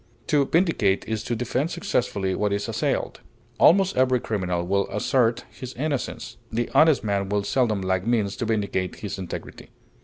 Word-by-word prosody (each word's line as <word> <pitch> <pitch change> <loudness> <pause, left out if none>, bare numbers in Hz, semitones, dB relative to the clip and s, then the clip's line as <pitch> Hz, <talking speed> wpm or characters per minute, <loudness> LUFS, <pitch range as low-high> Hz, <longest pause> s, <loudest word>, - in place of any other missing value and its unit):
To 145 -2 +3
vindicate 160 - +2
is 110 -1 -2
to 120 - -1
defend 125 +6 -1
successfully 100 - -1
what 105 +2 0
is 100 0 -1
assailed. - - -2 0.4
Almost 190 +2 +5
every 130 -1 +3
criminal 90 -6 -2
will 100 +2 0
assert 115 +3 +1
his 130 -1 -9
innocence; 140 0 -3
the 120 +1 -2
honest 155 -3 +5
man 100 -2 -1
will 105 0 0
seldom 110 -3 +1
lack 95 +2 -1
means 110 -4 +1
to 120 - -2
vindicate 100 -4 -1
his 100 -1 -6
integrity. 90 -2 -7
110 Hz, 160 wpm, -24 LUFS, 100-130 Hz, 0.4 s, Almost